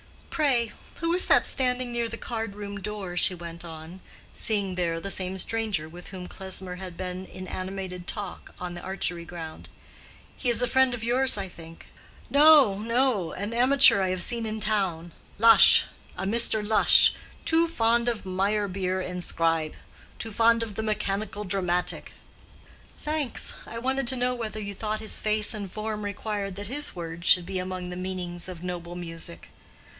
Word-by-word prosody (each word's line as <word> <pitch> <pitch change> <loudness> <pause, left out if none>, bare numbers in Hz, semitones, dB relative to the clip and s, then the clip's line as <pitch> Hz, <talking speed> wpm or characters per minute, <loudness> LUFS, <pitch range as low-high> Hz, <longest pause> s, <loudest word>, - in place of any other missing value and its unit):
"Pray, 255 -8 +1 0.2
who 335 0 -1
is 365 - +3
that - - +5
standing 250 -1 0
near 235 -1 -2
the 230 - -6
card 225 -4 -5
room 205 -1 -7
door?" 195 -3 -5
she 180 +1 +3
went 170 0 -9
on, 165 +2 -10 0.3
seeing 200 -4 0
there 170 -2 -1
the 195 +3 -4
same 190 0 0
stranger 210 -5 -1
with 175 +2 -12
whom 185 -2 -8
Klesmer 190 -1 -5
had 180 -2 -9
been 185 0 -5
in 185 0 -9
animated 185 -1 -6
talk 205 -4 -5
on 180 -1 -5
the 175 - -8
archery 180 -2 -3
ground. 165 -2 -9 0.7
"He 250 - -2
is 235 - +3
a - - +2
friend 260 0 +3
of 225 - -8
yours, 255 +1 +3
I 195 -1 -3
think." 165 -2 -13 0.5
"No, 285 -9 +6
no; 230 -6 0
an 205 +4 -5
amateur 255 -3 +6
I 190 - 0
have 185 -1 +1
seen 235 -2 0
in 215 0 -4
town; 190 -6 -1 0.3
Lush, 225 +1 +9 0.3
a - - -4
Mr. 220 0 +2
Lush—too 325 +8 +5
fond 235 -6 +1
of 230 -4 -4
Meyerbeer 190 -1 -1
and 180 -1 -4
Scribe—too 165 +7 -3
fond 230 +2 +3
of 220 -2 -6
the 220 - -4
mechanical 210 -1 -2
dramatic." 180 -2 -1 0.9
"Thanks. 300 -4 -2
I 230 - -7
wanted 265 +2 -1
to 260 - +2
know 250 0 +1
whether 225 -3 -5
you 200 -1 -5
thought 215 +2 -3
his 220 - -1
face 215 -1 +1
and 200 -4 -6
form 215 0 -4
required 205 -1 -4
that 205 +1 -7
his 285 +2 -2
words 170 0 -6
should 180 -1 +6
be 190 0 -3
among 180 -1 -5
the - - -6
meanings 180 -1 -5
of 175 -2 -9
noble 175 -1 -6
music?" 165 - -7
200 Hz, 170 wpm, -26 LUFS, 180-230 Hz, 0.9 s, Lush